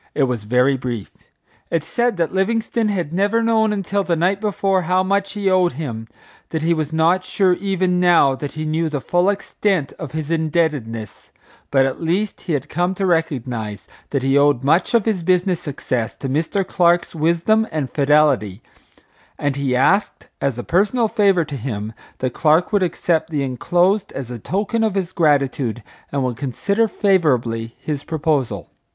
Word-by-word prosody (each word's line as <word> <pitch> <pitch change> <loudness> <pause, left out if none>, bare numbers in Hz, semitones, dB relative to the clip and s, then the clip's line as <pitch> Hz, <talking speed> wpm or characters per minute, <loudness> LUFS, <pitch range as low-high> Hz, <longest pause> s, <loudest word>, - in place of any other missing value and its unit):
It 145 - +2
was 125 -5 -1
very 125 +4 +2
brief. 120 -5 -5 0.6
It 165 -3 0
said 235 +6 0
that 165 0 -1
Livingstone 225 +3 0
had 175 -6 -2
never 205 +5 +1
known 220 -1 +2
until 200 0 -1
the 175 -2 0
night 185 +5 +1
before 195 -2 +1
how 180 +2 +1
much 200 +1 0
he 205 -2 -2
owed 185 -3 +3
him; 120 -6 -5 0.4
that 160 -1 -3
he 170 +1 +3
was 155 -2 -2
not 165 +3 +2
sure 185 0 +2
even 185 -1 0
now 175 -6 +5
that 140 +2 -6
he 155 0 -4
knew 160 +1 0
the 150 -2 -2
full 175 +7 +1
extent 195 -5 -1
of 155 -3 -7
his 155 0 -4
indebtedness, 150 - -2 0.4
but 135 -1 +3
at 135 +4 -3
least 185 +6 -1
he 170 - -3
had 140 -2 -2
come 175 +3 -1
to 195 - -1
recognize 125 - -2 0.2
that 140 -3 -1
he 135 +1 +3
owed 145 -3 +3
much 165 - +2
of 230 - +3
his 215 -5 0
business 180 0 +1
success 130 -6 -3
to 135 - -5
Mr. 160 +8 -1
Clark's 175 -2 +2
wisdom 170 +8 +2
and 150 -5 -3
fidelity; 140 -8 +2 0.7
and 145 -2 -1
he 140 -2 -1
asked 195 +11 +1
as 135 -4 -1
a 120 - -4
personal 215 +6 +1
favor 195 -6 +3
to 145 - -6
him 110 -4 -5 0.2
that 130 -1 -2
Clark 160 +5 +2
would 205 - +3
accept 170 -2 0
the 150 -4 -1
enclosed 180 - +1
as 130 -3 -6
a 120 - -6
token 205 - -1
of 215 -3 0
his 185 -2 -1
gratitude, 140 - +1 0.3
and 140 -1 -1
would 125 -2 -2
consider 200 - 0
favorably 125 - +1
his 145 -3 -4
proposal. 140 - -2
160 Hz, 175 wpm, -20 LUFS, 135-190 Hz, 0.7 s, now